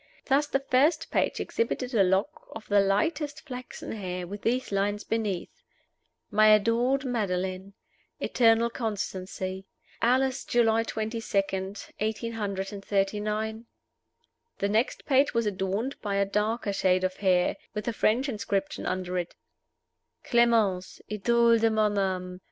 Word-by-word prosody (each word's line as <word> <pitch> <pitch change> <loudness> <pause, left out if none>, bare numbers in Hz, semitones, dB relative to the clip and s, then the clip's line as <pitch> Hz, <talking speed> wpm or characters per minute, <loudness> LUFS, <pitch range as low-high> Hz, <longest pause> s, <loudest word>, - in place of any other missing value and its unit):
Thus 285 +2 +2
the 275 -1 0
first 305 +5 +2
page - - +1
exhibited 255 - -2
a 220 - +4
lock 190 +9 +1
of 220 -1 -9
the 205 -1 +4
lightest 285 +10 0
flaxen 250 -3 -7
hair, 180 -4 -4
with 200 +3 -7
these 250 +1 0
lines 205 +1 0
beneath: 210 -6 -3 0.7
"My 215 +1 +5
adored 230 +6 +3
Madeline. 190 -5 -2 0.5
Eternal 230 -1 +3
constancy. 190 -4 -4 0.3
Alas, 260 +2 +2
July 225 -2 +3
22, 220 0 -3 0.2
1839!" 205 +1 -2 0.9
The 200 - 0
next 220 +4 0
page 275 -1 +3
was 230 -1 +2
adorned 200 +6 -2
by 200 -2 -2
a 200 0 +2
darker 210 +1 -1
shade 185 -1 +2
of 185 0 -1
hair, 180 -2 +2 0.2
with 210 +1 -4
a 235 - 0
French 235 +5 +2
inscription 200 -5 -2
under 185 -1 -2
it: 175 - -5 0.9
"Clemence. 225 -6 +2
Idole 235 +2 +3
de 225 0 +3
mon 215 -1 +2
âme. 185 -2 -2
215 Hz, 125 wpm, -27 LUFS, 195-235 Hz, 0.9 s, My